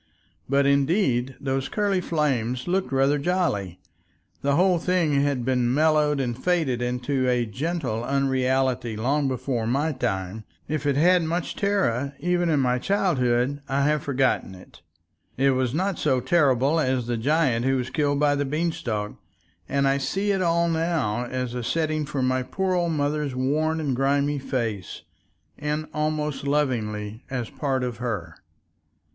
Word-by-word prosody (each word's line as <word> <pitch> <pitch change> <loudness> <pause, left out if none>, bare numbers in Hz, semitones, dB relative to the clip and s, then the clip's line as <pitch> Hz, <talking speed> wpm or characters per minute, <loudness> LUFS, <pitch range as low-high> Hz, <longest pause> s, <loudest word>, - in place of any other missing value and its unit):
But 140 0 +3
indeed 140 - +2
those 135 -1 -2
curly 200 -3 0
flames 130 -7 -1
looked 185 -1 0
rather 135 +2 +2
jolly. 140 - -1 0.6
The 140 0 +1
whole 180 +1 +3
thing 165 -5 +1
had 140 -4 0
been 125 -2 +1
mellowed 150 0 +3
and 120 -3 -1
faded 140 -4 0
into 125 +2 0
a 125 -1 +1
gentle 130 - -3
unreality 130 -3 0
long 140 +6 +1
before 125 -3 -2
my 140 +6 +1
time; 110 -6 -3 0.2
if 150 -1 -2
it 140 - +2
had 180 +4 +5
much 165 +1 -2
terror 140 - 0
even 175 -1 +1
in 150 -3 +2
my 125 -1 +1
childhood 140 -7 +1
I 140 +1 +1
have 150 +1 +2
forgotten 130 -9 0
it, 90 - -16 0.6
it 135 +1 +4
was 130 -2 0
not 185 +5 -1
so 130 - +2
terrible 140 0 +2
as 130 -4 0
the 120 0 -1
giant 130 -1 +1
who 135 0 +2
was 125 -1 -3
killed 145 -2 +1
by 145 -1 +3
the 145 0 0
Beanstalk, 135 -8 -2 0.6
and 140 0 +2
I 135 +1 +2
see 195 +10 -1
it 195 -1 0
all 170 -1 +2
now 160 -9 0
as 125 -1 -3
a 125 -1 -3
setting 155 +2 -1
for 140 -3 -2
my 130 0 +1
poor 185 +9 -2
old 170 -2 +1
mother's 145 -2 -1
worn 155 +5 0
and 140 -5 -1
grimy 140 +2 +1
face, 115 -8 -3 0.6
and 150 +1 -2
almost 150 -2 -2
lovingly 110 -7 -1
as 125 -4 -3
a - - -21
part 135 -3 -1
of 120 -2 -3
her. 105 -9 -4
140 Hz, 160 wpm, -25 LUFS, 125-155 Hz, 0.6 s, had